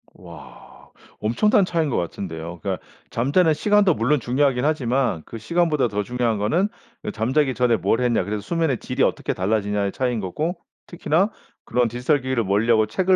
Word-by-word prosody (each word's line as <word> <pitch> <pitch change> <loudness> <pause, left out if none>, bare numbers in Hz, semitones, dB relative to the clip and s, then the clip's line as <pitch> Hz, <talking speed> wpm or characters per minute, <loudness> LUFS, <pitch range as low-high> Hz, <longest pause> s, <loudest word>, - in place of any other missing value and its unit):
와. - - -13 0.5
엄청난 195 - +3
차이인 165 -4 0
것 - - -1
같은데요? 85 -1 -5
그러니까 - - -3 0.3
잠자는 155 +7 +2
시간도 200 +3 +3
물론 140 +5 +1
중요하긴 130 +1 +1
하지만 130 - 0
그 115 - -8
시간보다 150 +1 +1
더 105 -1 -2
중요한 120 -1 -1
거는 140 - +1 0.4
예 - - -2
잠자기 130 +5 +1
전에 120 -2 +2
뭘 115 - +1
했냐 120 -5 +2
그래서 105 +2 -3
수면의 160 - -1
질이 - - -1
어떻게 - - 0
달라지냐의 100 0 0
차이인 125 -3 -1
거고 150 - -3 0.3
특히나 175 +3 +1 0.4
그런 120 0 +1
디지털 125 +5 0
기기를 130 -3 0
멀리하고 110 +2 +2
책을 185 - +2
125 Hz, 405 characters per minute, -22 LUFS, 110-155 Hz, 0.5 s, 엄청난